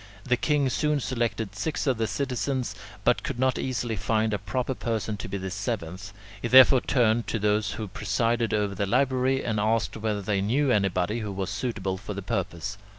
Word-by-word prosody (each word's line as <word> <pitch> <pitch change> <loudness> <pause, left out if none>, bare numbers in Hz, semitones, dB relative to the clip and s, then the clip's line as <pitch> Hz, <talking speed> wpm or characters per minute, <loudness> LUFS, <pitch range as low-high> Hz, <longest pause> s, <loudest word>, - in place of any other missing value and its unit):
The 125 +1 +2
king 145 +2 +1
soon 150 +2 +1
selected 115 -5 -2
six 150 +9 -2
of 130 -5 +1
the 110 - +1
citizens, 130 0 -2 0.3
but - - +3
could - - -4
not 130 +1 +2
so - - -2
easily 120 -3 -2
find 110 +3 0
a 105 - 0
proper 120 +7 -2
person 110 -3 -2
to 100 - -6
be 100 - -3
the 95 -1 -5
seventh. 100 -2 -4 0.3
He - - -1
therefore 130 +1 +8
turned 120 -2 +2
to - - -1
those 105 0 +1
who 110 - -5
presided 115 +3 0
over 105 -2 0
the 100 +1 -2
library, 130 +3 +2
and 110 -3 0
asked 110 +1 +1
whether 105 -2 -2
they 100 0 0
knew 130 +7 +2
anybody 100 0 +1
who 105 -3 -4
was 95 0 -3
suitable 100 -4 -2
for 105 0 -6
the 100 - -5
purpose. 100 -1 -3
110 Hz, 200 wpm, -26 LUFS, 100-125 Hz, 0.3 s, therefore